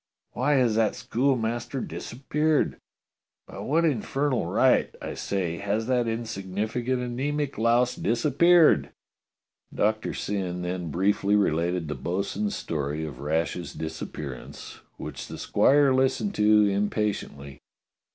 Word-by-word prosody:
Why 135 +5 +1
has 125 -5 +3
that 110 -2 +2
schoolmaster 120 0 -1
disappeared? 150 +6 -1 0.7
By - - -9
what 165 +4 +1
in 140 -9 +1
fernal 135 -8 -1
right, - - +3
I - - -5
say, 90 -4 -2
has 100 +2 -1
that 125 -1 +1
insignificant 115 +3 -2
anaemic 140 +4 -2
louse 120 +2 +3
disappeared?" 150 +8 +4 0.8
Doctor 110 +1 0
Syn 90 -3 -3
then 90 -1 -3
briefly 100 +4 +1
related 85 -3 +1
the 75 - -2
bo'sun's 100 - -2
story 75 0 -3
of 70 -5 -8
Rash's 80 +3 -2
disappearance, 75 -4 -7 0.2
which - - -7
the - - -8
squire 140 -1 +4
listened 130 +10 +1
to 105 0 +4
im 100 +1 +1
patiently. 70 -10 -4
110 Hz, 120 wpm, -26 LUFS, 90-130 Hz, 0.8 s, disappeared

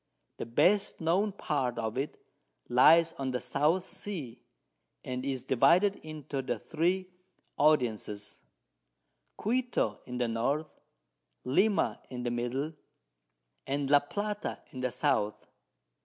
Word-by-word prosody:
The - - -5
best 195 - +3
known 180 +6 +2
Part 135 -10 -2
of 110 -1 -2
it 135 +3 -3 0.5
lies 165 +7 +6
on 135 -1 -1
the 125 -1 -1
South 160 +9 +1
Sea, 145 - -7 0.6
and 130 0 -4
is 135 -2 -2
divided 175 - +4
into 150 -3 -5
the 130 - -2
3 180 +4 0 0.5
Audiences 120 -8 +1
of - - -46
Quito 245 +3 0
in 125 0 -5
the 120 -1 +1
North, 140 +7 -1 0.7
Lima 200 +11 +2
in 125 -1 -5
the 120 - -1
Middle, 125 +6 -2 0.9
and 140 0 -1
La 145 - +8
Plata 205 +8 -4
in 130 - -8
the 130 0 0
South. 105 -3 +1
140 Hz, 125 wpm, -30 LUFS, 125-170 Hz, 0.9 s, La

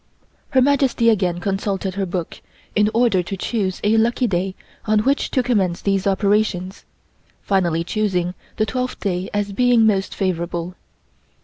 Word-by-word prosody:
Her 260 -2 +4
Majesty 265 -4 +3
again 180 -5 0
consulted 195 0 -2
her 195 0 -2
book 175 -1 -5 0.3
in 210 0 +3
order 230 -5 +3
to 190 +3 -5
choose 190 -2 -2
a 215 +2 +3
lucky 235 +3 +2
day 190 -2 -1 0.3
on 215 -1 +3
which 275 +5 +1
to 255 - +1
commence 195 -8 +1
these 195 0 0
operations, 195 -1 0 0.6
finally 175 -4 +1
choosing 180 -2 -1 0.2
the 215 - +2
twelfth 255 +2 -3
day 185 -2 -2
as 205 -1 -2
being 245 0 +4
most 195 -3 +1
favorable. 175 -1 -2
200 Hz, 145 wpm, -21 LUFS, 185-225 Hz, 0.6 s, Her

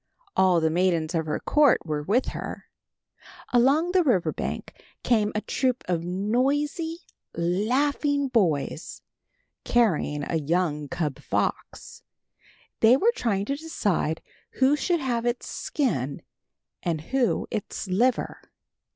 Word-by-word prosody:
All 185 -2 +4
the 160 -1 +1
maidens 170 -2 +1
of 160 -2 -1
her 150 - -1
court 295 - +3
were 150 -2 -2
with 215 - +1
her. - - -6 0.9
Along 275 +8 +4
the 370 0 +4
river 185 - +2
bank - - -6 0.2
came 215 -4 +2
a 215 - 0
troop 255 +1 -1
of 170 -2 0
noisy, 275 - -1 0.3
laughing 270 - +1
boys, 175 - -1 0.6
carrying 170 -11 +1
a 165 - -1
young 155 -1 0
cub 155 -4 -3
fox. - - -3 0.8
They 230 +3 +6
were 450 +10 +3
trying 200 - 0
to 275 - -1
decide 205 - -1 0.3
who 265 +2 +3
should 340 +2 0
have 240 -3 -1
its 240 0 -1
skin 140 - -2 0.6
and 165 -3 -1
who 245 - 0
its 210 -1 -4
liver. 235 +7 0
215 Hz, 125 wpm, -26 LUFS, 170-265 Hz, 0.9 s, They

